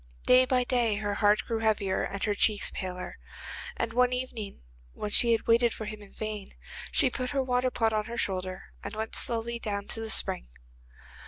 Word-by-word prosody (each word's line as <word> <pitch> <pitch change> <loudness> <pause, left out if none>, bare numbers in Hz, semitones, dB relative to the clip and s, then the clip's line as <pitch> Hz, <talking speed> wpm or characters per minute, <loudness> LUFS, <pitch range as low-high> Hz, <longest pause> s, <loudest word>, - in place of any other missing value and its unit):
Day 255 +1 +7
by 255 -1 +2
day 240 -4 +1
her 205 0 -2
heart 205 +1 +3
grew 225 -1 -2
heavier 205 -4 +1
and 200 0 -3
her 210 - +1
cheeks 205 0 +2
paler, 180 -1 -4 0.6
and 225 -1 -2
one 250 +1 +3
evening, 240 - -4 0.3
when 210 - -5
she 235 +2 +5
had 225 - +1
waited 235 0 +4
for 220 - -6
him 210 0 -7
in 200 - -13
vain, 215 -2 -5 0.4
she 260 - +4
put 255 0 -3
her 275 -2 0
water 250 0 +1
pot 225 -3 +1
on 215 -1 0
her 235 +1 -6
shoulder 185 -3 -3
and 200 +2 -6
went 220 +1 -4
slowly 235 0 0
down 200 -2 -3
to - - +2
the 225 0 -4
spring. - - +3
220 Hz, 195 wpm, -29 LUFS, 205-240 Hz, 0.6 s, Day